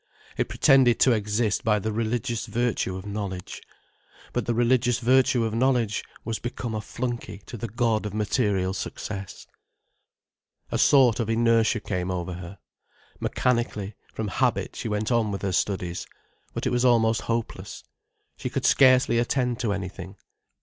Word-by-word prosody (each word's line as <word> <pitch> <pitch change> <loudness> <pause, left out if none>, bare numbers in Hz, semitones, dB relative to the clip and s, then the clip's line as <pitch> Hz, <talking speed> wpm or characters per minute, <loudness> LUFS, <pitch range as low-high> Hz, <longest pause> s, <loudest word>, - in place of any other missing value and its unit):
It - - -1
pretended 130 -3 +4
to 130 - +6
exist 105 -1 0
by 105 -1 +3
the 110 +2 -2
religious 115 +2 -2
virtue 120 -6 -1
of 95 +1 -7
knowledge. 100 -3 -5 0.7
But 120 -3 -2
the 120 - +1
religious 120 0 +3
virtue 125 0 +3
of 110 -1 -1
knowledge 120 -3 +1 0.2
was 115 -1 -2
become 120 -1 -4
a 110 - -2
flunkey 120 -4 -5
to 125 - -8
the 115 +1 -4
god 110 -1 0
of 105 - -7
material 105 -4 0
success. 100 0 -6 1.3
A - - 0
sort 130 -5 +5
of 115 -2 -1
inertia 115 0 +3
came 90 -3 -3
over 90 -1 -3
her. 90 +2 -8 0.6
Mechanically, 115 -5 -1 0.2
from 110 -2 -4
habit, - - 0
she - - -4
went 105 +2 -1
on 115 -3 +2
with 100 - -5
her 100 - 0
studies. 90 -2 -1 0.5
But - - -3
it 130 - +1
was 125 0 +1
almost 115 -3 +3
hopeless. 115 -1 -4 0.5
She - - -4
could - - -2
scarcely 130 -3 +5
attend 125 0 0
to 115 - 0
anything. 95 -1 -5
110 Hz, 155 wpm, -25 LUFS, 100-120 Hz, 1.3 s, to